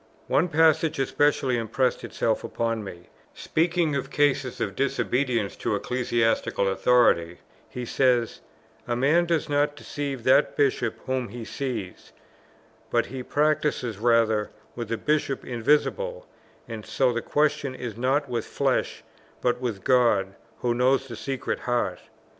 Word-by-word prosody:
One 165 - +2
passage 160 -1 +3
especially 135 -2 +1
impressed 120 +3 0
itself 110 -1 -1
upon 115 -2 -2
me: 85 -3 -10 0.3
speaking 165 -2 0
of 140 - -3
cases 145 -3 +1
of 100 - -2
disobedience 125 -4 0
to - - -1
ecclesiastical 115 -3 0
authority, 95 -4 +3 0.3
he 125 -1 -5
says, 125 -2 +1 0.5
"A 120 - 0
man 155 +8 +3
does 165 -2 0
not 145 0 +1
deceive 140 -3 -5
that 130 +4 +3
Bishop 140 -2 +1
whom 130 -2 -1
he 115 +2 -8
sees, 115 -10 -5 0.8
but 120 -1 +2
he 130 +1 -6
practises 145 -6 0
rather 110 -2 +2 0.3
with 120 -2 -5
the 115 - -1
Bishop 150 -1 -1
Invisible, 150 - 0 0.4
and 110 -2 -7
so 130 +2 +1
the 120 - -2
question 150 -2 0
is 120 -5 -6
not 135 +5 +1
with 120 -3 -3
flesh, - - -1 0.4
but 125 0 0
with 110 -6 -3
God, 115 -7 +3 0.3
who 120 -1 +1
knows 130 +2 +2
the 120 - -7
secret 130 +4 -3
heart." 120 -7 -1
125 Hz, 135 wpm, -25 LUFS, 115-145 Hz, 0.8 s, passage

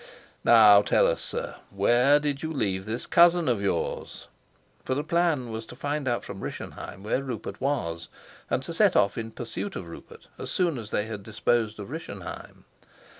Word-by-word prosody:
Now 105 -3 +8
tell - - +3
us, - - +1
sir, - - -4
where 120 +8 +4
did 145 -1 -2
you 160 - -3
leave 100 -9 -1
this 115 +3 -3
cousin 170 0 +5
of 120 -5 +1
yours?" 95 -4 -3 0.5
For 130 - -1
the 145 - -1
plan 160 -7 +1
was 110 0 -6
to - - -10
find 145 +1 -3
out 120 -1 0
from 100 -1 -8
Rischenheim 95 - -7
where 110 +5 0
Rupert 125 -6 -6
was, 85 -12 -2 0.4
and - - 0
to - - -6
set - - +4
off 100 -1 +3
in 115 -1 -4
pursuit 125 - -6
of 85 - -6
Rupert 85 - -12
as - - -5
soon 170 -8 0
as 110 -2 -8
they 105 - 0
had 110 -2 -6
disposed 110 +1 0
of 100 +4 -7
Rischenheim. 100 - -8
120 Hz, 180 wpm, -27 LUFS, 105-145 Hz, 0.5 s, Now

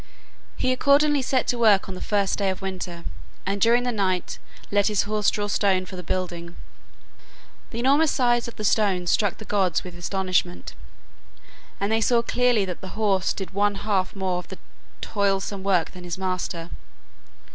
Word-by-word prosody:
He 255 - +1
accordingly 285 +2 +4
set 260 0 +1
to 245 - 0
work 210 -4 +4
on 190 - -5
the 185 - -8
first 200 -1 0
day 200 -1 +1
of 190 +1 -4
winter, 180 -3 -5 0.4
and 200 +1 -2
during 235 +3 +4
the 245 - 0
night 190 -5 -1 0.3
let 205 0 +3
his 210 -3 +2
horse 210 0 +1
draw 205 - -2
stone 195 -2 +1
for 185 - -9
the 180 - -6
building. 175 -1 -4 1.1
The 230 - -7
enormous 280 +6 +3
size 240 -3 +2
of 235 - -9
the 215 - -6
stones 195 -4 +2
struck 205 -4 +1
the 215 - -10
gods 190 -5 +1
with 180 - -9
astonishment, 175 - -1 1.1
and 200 +2 -1
they 225 0 +2
saw 235 +2 +3
clearly 245 -4 +2
that 180 -2 -6
the 190 +1 -8
horse 195 -4 +2
did 190 - -5
one 205 +1 +1
half 195 -2 -1
more 185 -2 -1
of 180 - -10
the - - -9 0.4
toilsome 200 -1 -1
work 190 -4 +1
than 180 - -11
his 175 0 -5
master. 185 -2 -3
200 Hz, 180 wpm, -24 LUFS, 185-220 Hz, 1.1 s, accordingly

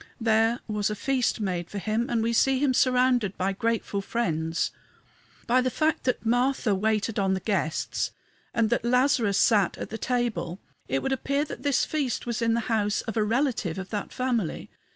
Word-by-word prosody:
There 225 +1 +2
was 210 -1 0
a 210 - -2
feast 255 +3 0
made 180 -5 -2
for 205 - -6
him, 220 +4 -1
and 230 -2 +1
we 230 +1 0
see 265 +3 +3
him 270 -1 +2
surrounded 250 -5 +2
by 195 +1 0
grateful 220 -1 -1
friends. 165 -7 -1 0.7
By 255 +2 +3
the 255 - +1
fact 310 +4 0
that 250 -2 0
Martha 245 -1 +2
waited 215 +2 0
on 190 -1 +2
the - - -2
guests 190 -6 -1 0.4
and 225 -1 +1
that 235 - +1
Lazarus 245 -4 +2
sat 200 -3 +3
at - - -6
the 225 - -5
table 215 -8 -1 0.3
it 135 +1 -1
would - - -1
appear 280 +3 0
that - - -8
this 285 -3 +2
feast 285 -6 -2
was 235 -1 -2
in 230 0 +2
the 235 - +1
house 215 -3 0
of 225 - -6
a 220 - +2
relative 225 - 0
of 190 0 -6
that 205 -2 -3
family. 240 -9 -2
225 Hz, 190 wpm, -26 LUFS, 205-250 Hz, 0.7 s, see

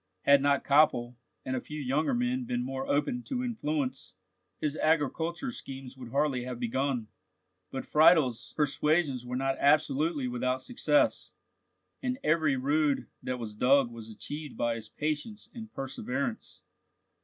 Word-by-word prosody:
Had 140 -1 +6
not 140 0 +2
Koppel 130 -4 +3 0.3
and 130 - -1
a 125 - -2
few 150 0 -7
younger 145 - +1
men 250 +1 0
been 125 - -2
more 135 0 -4
open 150 +13 0
to 255 -3 -2
influence, 150 - -3 0.4
his 150 -1 -1
agricultural 165 - 0
schemes 135 - -8
could 125 -3 -10
hardly 140 -2 +1
have 125 -1 -5
begun; 125 -1 -1 0.6
but 135 - -5
Friedel's 155 -6 +4
persuasions 150 -3 +1
were 125 - -3
not 135 +1 0
absolutely 150 0 +2
without 125 +1 -1
success, 260 - +1 0.7
and 255 -1 -1
every 155 -3 +3
rood 145 +2 +1 0.2
that 125 - -3
was 115 -3 -6
dug 130 +3 +3
was 115 -1 -9
achieved 145 +6 -7
by 120 0 +1
his 115 -1 -7
patience 155 +8 -4
and 220 -2 -9
perseverance. 235 - -4
140 Hz, 145 wpm, -29 LUFS, 130-160 Hz, 0.7 s, Had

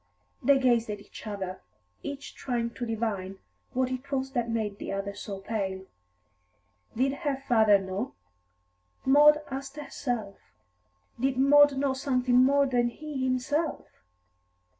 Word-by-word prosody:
They 280 +2 +5
gazed 240 -4 +2
at 210 -1 -4
each 200 - -12
other, 190 -3 -5 0.4
each 285 0 -7
trying 235 -3 -2
to 240 0 -5
divine 210 -4 -3 0.4
what 260 0 0
it 260 +2 -5
was 265 -1 -1
that 240 -3 -1
made 215 -3 -2
the - - -5
other 195 +1 -3
so 200 0 -6
pale. 195 -2 -3 1.1
Did 265 +4 +1
her 290 -4 -1
father 220 -4 +6
know? 190 - -4 0.9
Maud 295 +3 +6
asked 275 +2 -6
herself. 245 -8 -4 0.8
Did 260 +1 0
Maud 285 +1 +6
know 275 -1 +1
something 255 -2 +1
more 280 +2 +5
than 245 -3 +2
he 290 +1 -5
himself? 275 +5 -1
250 Hz, 135 wpm, -28 LUFS, 215-275 Hz, 1.1 s, father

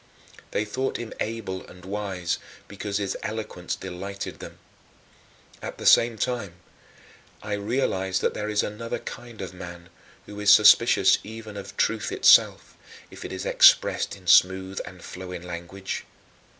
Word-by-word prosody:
They 105 - -1
thought 130 +6 -2
him 120 -2 -7
able 105 -4 -4
and 90 0 -14
wise 95 -3 -3 0.3
because 100 0 -4
his 100 -2 -2
eloquence 110 -5 -4
delighted 95 +2 -7
them. - - -10 1.0
At - - -7
the - - -8
same 115 -1 +5
time 120 -7 -2 0.9
I 105 - -4
realized 100 -3 -1
that - - +1
there 105 0 -4
is 105 0 +1
another 115 +3 -4
kind 120 -3 -9
of 95 -1 -6
man 85 -1 -10 0.4
who 105 0 -9
is 105 0 +5
suspicious 105 - +6
even 110 -1 -9
of 100 - -9
truth - - 0
itself, - - +4 0.4
if - - -10
it - - -7
is - - -5
expressed - - +4
in 95 -2 -17
smooth 95 +2 +4
and 90 -1 -12
flowing 90 -1 -8
language. 90 +2 -6
100 Hz, 145 wpm, -25 LUFS, 95-105 Hz, 1.0 s, suspicious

